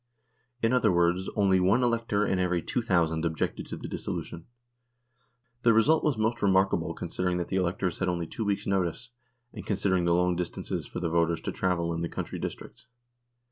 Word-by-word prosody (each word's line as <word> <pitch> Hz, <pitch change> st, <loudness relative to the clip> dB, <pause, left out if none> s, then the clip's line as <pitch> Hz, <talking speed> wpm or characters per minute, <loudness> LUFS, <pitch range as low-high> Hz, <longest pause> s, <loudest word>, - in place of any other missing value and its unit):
In 115 Hz, +2 st, +3 dB
other 125 Hz, -5 st, +4 dB
words, 85 Hz, +1 st, +2 dB
only 95 Hz, -3 st, +3 dB
one 100 Hz, +8 st, +3 dB
elector 115 Hz, -3 st, +1 dB
in 95 Hz, -, 0 dB
every 90 Hz, -2 st, 0 dB
2,000 85 Hz, -9 st, 0 dB
objected 80 Hz, -1 st, -2 dB
to -, -, -6 dB
the -, -, -7 dB
dissolution. 85 Hz, 0 st, -5 dB, 1.1 s
The 115 Hz, -2 st, +5 dB
result 150 Hz, +8 st, +4 dB
was 150 Hz, -6 st, +1 dB
most 110 Hz, +2 st, 0 dB
remarkable 95 Hz, -1 st, +2 dB
considering 90 Hz, -1 st, -2 dB
that 85 Hz, -, -3 dB
the 95 Hz, -, 0 dB
electors 90 Hz, 0 st, -1 dB
had 95 Hz, -, 0 dB
only 85 Hz, -1 st, -1 dB
two 110 Hz, -, -5 dB
weeks' 100 Hz, -1 st, -1 dB
notice, 95 Hz, +5 st, -1 dB, 0.4 s
and 105 Hz, -, -7 dB
consider 100 Hz, -2 st, 0 dB
ing 90 Hz, -, 0 dB
the 85 Hz, 0 st, +3 dB
long 90 Hz, 0 st, +2 dB
distances 90 Hz, -1 st, -4 dB
for -, -, -6 dB
the 85 Hz, -2 st, -1 dB
voters 85 Hz, 0 st, +1 dB
to -, -, -3 dB
travel 85 Hz, -3 st, 0 dB
in 85 Hz, -, -3 dB
the 85 Hz, -, -2 dB
country -, -, -5 dB
districts. -, -, -7 dB
95 Hz, 185 wpm, -28 LUFS, 85-105 Hz, 1.1 s, The